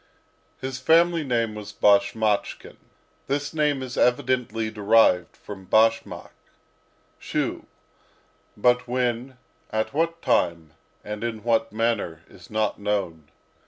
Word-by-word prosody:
His 130 Hz, -1 st, -5 dB
family 165 Hz, +4 st, +3 dB
name 115 Hz, -5 st, -1 dB
was 105 Hz, -1 st, -8 dB
Bashmachkin. 105 Hz, +1 st, +1 dB, 0.5 s
This 145 Hz, +2 st, -2 dB
name 150 Hz, -3 st, 0 dB
is 130 Hz, -1 st, -7 dB
evidently 125 Hz, -3 st, +1 dB
derived 105 Hz, -4 st, +3 dB
from 95 Hz, -2 st, -10 dB
bashmak 115 Hz, +3 st, +1 dB, 0.9 s
(shoe); -, -, -3 dB, 0.9 s
but, 125 Hz, +3 st, +2 dB
when, 125 Hz, +1 st, -2 dB, 0.3 s
at 110 Hz, 0 st, -2 dB
what 165 Hz, +2 st, -1 dB
time, 85 Hz, -2 st, 0 dB, 0.3 s
and 105 Hz, +1 st, -6 dB
in 110 Hz, -3 st, -4 dB
what 115 Hz, -1 st, +1 dB
manner, 110 Hz, -7 st, -1 dB
is 90 Hz, -3 st, -16 dB
not 110 Hz, -1 st, -1 dB
known. 100 Hz, -7 st, -3 dB
115 Hz, 110 wpm, -24 LUFS, 105-130 Hz, 0.9 s, family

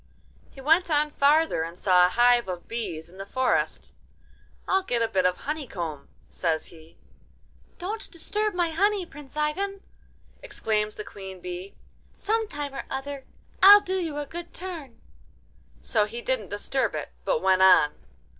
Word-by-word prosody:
He -, -, -15 dB
went 320 Hz, +6 st, +3 dB
on 300 Hz, -1 st, +2 dB
farther 295 Hz, -, +3 dB
and 165 Hz, +2 st, -5 dB
saw 180 Hz, -2 st, +5 dB
a -, -, -3 dB
hive 240 Hz, +1 st, +4 dB
of 180 Hz, -2 st, -6 dB
bees 190 Hz, -9 st, -4 dB
in 185 Hz, +3 st, -16 dB
the 195 Hz, -, -5 dB
forest. 260 Hz, +3 st, 0 dB, 0.7 s
'I'll 380 Hz, 0 st, +3 dB
get 245 Hz, -10 st, -1 dB
a -, -, +2 dB
bit 185 Hz, -3 st, +2 dB
of 180 Hz, -, -1 dB
honeycomb,' 180 Hz, -, -5 dB, 0.2 s
says 160 Hz, -3 st, -1 dB
he. 160 Hz, 0 st, -16 dB, 0.8 s
'Don't 410 Hz, +5 st, -5 dB
disturb 420 Hz, +4 st, -2 dB
my 345 Hz, -2 st, +1 dB
honey, 395 Hz, +3 st, +1 dB
Prince 295 Hz, -3 st, -12 dB
Ivan!' 385 Hz, +7 st, -1 dB, 0.6 s
exclaims 215 Hz, -1 st, -1 dB
the 210 Hz, -, -6 dB
queen 190 Hz, -2 st, -9 dB
bee; 180 Hz, +2 st, -7 dB, 0.4 s
'some 445 Hz, +2 st, 0 dB
time 290 Hz, -5 st, -5 dB
or 270 Hz, -, -5 dB
other 270 Hz, 0 st, -5 dB, 0.4 s
I'll 405 Hz, +2 st, +10 dB
do 375 Hz, 0 st, -2 dB
you 320 Hz, -5 st, -3 dB
a 295 Hz, -, -3 dB
good 345 Hz, +4 st, -8 dB
turn.' 330 Hz, -9 st, -7 dB, 0.8 s
So 215 Hz, -3 st, +2 dB
he 235 Hz, +3 st, -7 dB
didn't 255 Hz, -7 st, -1 dB
disturb 230 Hz, +6 st, -1 dB
it, -, -, -4 dB
but -, -, 0 dB
went 190 Hz, 0 st, +4 dB
on. 185 Hz, -6 st, +6 dB
265 Hz, 160 wpm, -26 LUFS, -, 0.8 s, I'll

